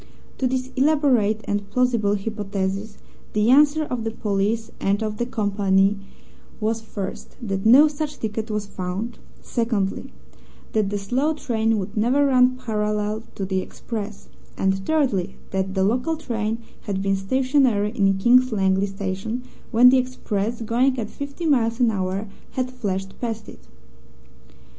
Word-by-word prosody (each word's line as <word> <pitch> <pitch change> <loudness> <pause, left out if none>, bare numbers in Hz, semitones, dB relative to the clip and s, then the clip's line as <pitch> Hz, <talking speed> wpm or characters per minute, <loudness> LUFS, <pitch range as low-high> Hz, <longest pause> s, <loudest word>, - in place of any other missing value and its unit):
To 260 - +2
this 255 0 -2
elaborate 260 -7 +3
and 205 0 -2
plausible 230 -3 +2
hypothesis 200 0 -3 0.4
the 215 +3 +3
answer 295 +3 +5
of 250 -6 -3
the 225 - -1
police 215 +1 -1
and 200 +3 +1
of 215 -1 -3
the 240 - -1
company 200 -3 +2 0.6
was, 225 +1 -1
first, 200 -3 -6
that 195 -4 -2
no 275 +7 +8
such 295 0 -4
ticket 220 0 -3
was 210 -1 -2
found; 195 +4 -5 0.2
secondly, 225 -5 -1 0.6
that 215 -3 +1
the 205 - -1
slow 260 +10 0
train 225 -5 0
would 200 +1 -4
never 250 +7 +3
run 255 -2 +4
parallel 210 -2 -1
to 195 - -3
the 190 0 0
express; 210 0 -6 0.3
and, 190 0 +1
thirdly, 220 - +1 0.2
that 190 0 -2
the 190 - +2
local 250 +10 +1
train 225 -5 -2 0.3
had 195 -1 -1
been 195 0 +2
stationary 250 0 +2
in 195 -4 +2
King's 250 +5 +5
Langley 195 -1 +2
Station 195 +5 -4 0.3
when 245 +1 +7
the 260 0 +5
express, 235 -3 -2
going 255 +4 +2
at 220 -3 -4
fifty 280 +4 -6
miles 235 -6 +2
an 240 -2 +4
hour, 190 0 -2 0.3
had 255 -1 -2
flashed 195 -6 -4
past 225 -3 -3
it. - - -14
220 Hz, 150 wpm, -23 LUFS, 200-250 Hz, 0.6 s, no